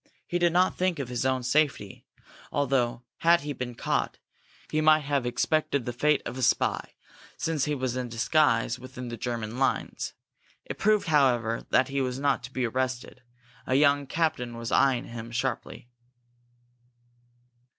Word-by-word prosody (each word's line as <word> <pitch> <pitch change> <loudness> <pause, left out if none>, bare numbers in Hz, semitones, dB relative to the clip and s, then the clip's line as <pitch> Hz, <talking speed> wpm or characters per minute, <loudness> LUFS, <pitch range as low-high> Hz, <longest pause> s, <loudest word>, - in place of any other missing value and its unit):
He 175 - -1
did 175 -1 +3
not 180 +2 +3
think 185 -2 +1
of 135 -4 -4
his 125 +1 -1
own 130 -1 0
safety, 125 -6 0 0.4
although, 125 -4 0
had 170 +1 +4
he 145 0 -4
been 125 -2 -5
caught, - - -1 0.5
he 155 - +1
might 155 0 +5
have 140 -3 0
expected 140 +1 0
the 120 - -3
fate 150 +4 +2
of 125 +2 -5
a - - -3
spy, - - +1 0.4
since 160 -4 0
he 150 -1 -1
was 130 -2 -2
in 125 -1 -3
disguise 120 -1 +2
within 125 -1 -8
the 120 - -5
German 115 0 -4
lines. 135 - -1 0.5
It - - -7
proved, 215 0 +3
however, 125 -7 +2
that 130 - +3
he 140 0 -1
was 125 -1 -2
not 140 -1 +1
to 130 - -11
be 130 -1 -1
arrested. 130 +1 -3 0.5
A 130 - +1
young 140 0 +4
captain 125 -7 -1
was 115 0 -5
eyeing 130 -3 +3
him 115 -1 -8
sharply. 120 0 -3
130 Hz, 160 wpm, -27 LUFS, 120-150 Hz, 0.5 s, might